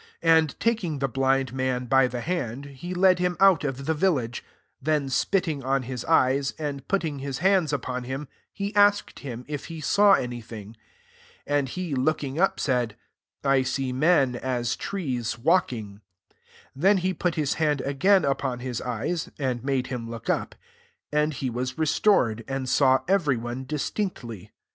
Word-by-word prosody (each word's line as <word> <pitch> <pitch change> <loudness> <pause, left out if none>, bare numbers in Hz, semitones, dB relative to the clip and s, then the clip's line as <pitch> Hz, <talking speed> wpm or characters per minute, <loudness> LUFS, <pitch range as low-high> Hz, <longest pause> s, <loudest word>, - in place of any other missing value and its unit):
23 165 -1 +6
And 155 -3 -6
taking 215 -10 0
the 135 0 0
blind 135 0 +1
man 130 -1 -1
by 135 +1 +4
the 125 -1 -5
hand, 140 -5 -3
he 145 +6 -7
led 185 0 +4
him 180 -1 0
out 190 -5 +5
of 135 -1 -3
the 160 - +1
village: 150 -8 0 0.4
then 150 -1 0
spitting 160 -1 0
on 135 0 0
his 125 -1 -5
eyes, 135 -3 +2
and 145 -3 -5
putting 165 -7 -1
his 135 -1 -4
hunds 190 -5 +3
upon 130 -3 -3
him, 135 +3 -5 0.2
he 200 +1 -4
asked 205 0 +3
him 125 -3 -7
if 145 -2 -5
he 165 0 -7
saw 200 +6 +4
any 120 -7 0
thing. 110 -1 -10 0.7
24 145 - -1
And 135 -2 -3
he 180 +1 -4
looking 140 +1 -1
up, 195 - +2
said, 120 -5 0 0.2
" - - -68
I 135 -1 +3
see 130 0 -2
men, 140 -2 +3
as 120 -2 -1
trees, 130 - -3
walking." 120 - 0 0.3
25 - - -37 0.4
Then 190 +9 +4
he 185 +1 0
put 180 -1 -1
hie 150 0 0
hand 150 -3 +1
again 185 +6 +3
upon 135 -2 -1
his 125 -1 -4
eyes, 125 +8 -3
[and 125 -4 -2
made 135 -2 0
him 115 -2 -5
look 115 -1 -3
up - - -2 0.3
:] - - -40
and 150 +1 +2
he 130 -2 -3
was 125 +2 -3
restored, 150 - +2
and 135 -1 -3
saw 130 0 +3
every 170 -9 +2
one 120 +3 -5
distinctly. 130 - -4
135 Hz, 175 wpm, -25 LUFS, 125-165 Hz, 0.7 s, 23